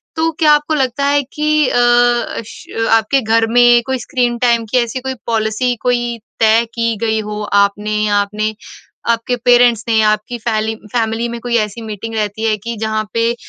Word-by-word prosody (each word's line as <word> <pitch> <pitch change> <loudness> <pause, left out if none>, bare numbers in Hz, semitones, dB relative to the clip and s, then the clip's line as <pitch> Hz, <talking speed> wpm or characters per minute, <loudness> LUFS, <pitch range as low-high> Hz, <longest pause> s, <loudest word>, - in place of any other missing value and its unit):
तो 325 0 0
क्या 305 -2 +5
आपको 295 +1 +1
लगता 270 -1 0
है 285 0 +3
कि 300 +1 0
अ, - - 0
अश 240 -2 +1
अ, 225 - 0
आपके 245 +5 0
घर 225 0 +2
में 240 0 +6
कोई 265 0 -1
स्क्रीन-टाइम 240 -1 0
की 255 - +2
ऐसी 235 +2 -5
कोई 265 +1 -4
पॉलिसी 225 +2 0
कोई 240 -1 -1 0.2
तय 225 +1 +4
की 230 -1 -1
गई 220 0 0
हो 210 0 -5 0.2
आपने 210 +1 -2
या 205 -1 +1
आपने 215 +2 -3 0.6
आपके 235 +2 0
पेरेंट्स 245 -2 +4
ने 230 - +1
या 215 -1 +4
आपकी 215 +3 -2
फैली 220 -1 -1 0.2
फ़ैमिली 230 0 -1
में 235 - -6
कोई 240 -1 -2
ऐसी 215 +1 -2
मीटिंग 220 +1 -6
रहती 215 0 -3
है 215 - +1
कि 235 - -3
जहाँ 220 0 -1
पे 230 0 +1
235 Hz, 185 wpm, -16 LUFS, 220-245 Hz, 0.6 s, में